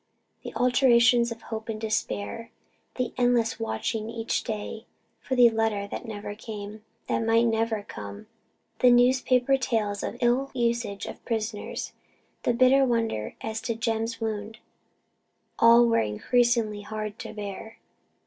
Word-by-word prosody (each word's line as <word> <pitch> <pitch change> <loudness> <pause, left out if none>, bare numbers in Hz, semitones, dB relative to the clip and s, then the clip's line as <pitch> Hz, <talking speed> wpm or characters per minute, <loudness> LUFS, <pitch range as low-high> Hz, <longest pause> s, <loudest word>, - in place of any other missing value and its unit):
The - - -6
alternations 245 -1 +4
of 230 0 -8
hope 220 0 -6
and 215 -1 -3
despair, 215 - -3 0.5
the 255 -2 -2
endless 245 -2 +2
watching 115 - -2
each 230 -1 -2
day 220 0 -5 0.3
for 260 - -3
the 240 -2 +7
letter 220 -2 0
that - - -6
never 205 -1 -6
came 210 0 -8 0.2
that - - -1
might 225 +1 +3
never 225 -2 0
come 100 - -9 0.5
the 250 - +6
newspaper 250 +1 +4
tales 215 -6 -1
of - - -4
ill 250 +3 +2
usage 235 -4 -1
of - - -9
prisoners 220 -2 -4 0.5
the 245 - +1
bitter 255 +3 +5
wonder 230 - -1
as 220 0 -4
to 230 - -2
Jem's 225 0 -2
wound 220 -1 -4 1.0
all 235 +1 +7
were 230 -1 +3
increasingly 220 - +1
hard 215 +1 -6
to 235 - -7
bear. 210 +1 -7
225 Hz, 140 wpm, -26 LUFS, 215-240 Hz, 1.0 s, the